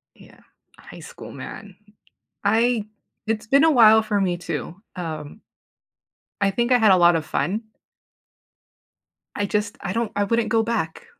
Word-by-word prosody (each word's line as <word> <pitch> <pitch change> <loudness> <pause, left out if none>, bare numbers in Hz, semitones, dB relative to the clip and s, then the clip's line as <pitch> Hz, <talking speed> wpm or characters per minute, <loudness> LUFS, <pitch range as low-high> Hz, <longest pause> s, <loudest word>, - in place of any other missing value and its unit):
Yeah, - - -19 0.4
high - - -13
school, - - -11
man, 200 -3 -10 0.7
I 225 +1 +2 0.4
it's 220 -1 -2
been 275 +6 +4
a 325 - +5
while 220 -4 +6
for 210 -2 -1
me 180 -3 0
too, 175 -1 -5 0.2
um, 160 +1 -7 1.0
I 195 - +2
think 240 +5 -1
I 250 - +6
had 220 -4 +4
a 185 - +6
lot 175 -1 +5
of 160 -1 -2
fun 210 +8 -2 1.7
I 205 - -1
just, 210 0 -2
I 185 - -4
don't 230 -1 -2
I 205 - +2
wouldn't 230 +2 0
go 225 -1 +2
back. 215 -8 -3
210 Hz, 155 wpm, -22 LUFS, 185-230 Hz, 1.7 s, while